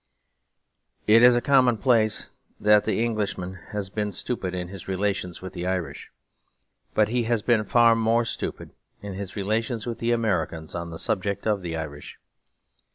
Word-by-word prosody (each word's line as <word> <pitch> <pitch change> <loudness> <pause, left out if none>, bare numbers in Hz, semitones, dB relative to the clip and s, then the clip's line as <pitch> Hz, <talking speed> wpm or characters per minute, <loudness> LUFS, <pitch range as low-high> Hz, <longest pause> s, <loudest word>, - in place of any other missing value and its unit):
It 110 +2 +6
is 125 0 +7
a 120 - +2
commonplace 120 -5 +3 0.3
that 105 0 +4
the 110 +1 +1
Englishman 100 -5 -3
has 105 -3 -5
been 105 0 -2
stupid 95 -2 -3
in 90 -1 -4
his 95 -2 -9
relations 95 -2 -2
with 95 - -7
the 90 - -4
Irish; 90 -6 -3 0.9
but 105 -1 +3
he 120 0 0
has 115 -2 0
been 115 -2 +3
far 115 +2 +5
more 115 +1 +2
stupid - - -5 0.3
in 100 -1 -5
his 95 0 -6
relations 110 +3 -1
with 120 -2 -4
the 115 +1 0
Americans 85 -9 -1
on 85 0 -4
the 80 - -7
subject 100 +2 -2
of 105 -3 +1
the 85 -2 -4
Irish. 75 -2 -7
105 Hz, 160 wpm, -25 LUFS, 95-115 Hz, 0.9 s, is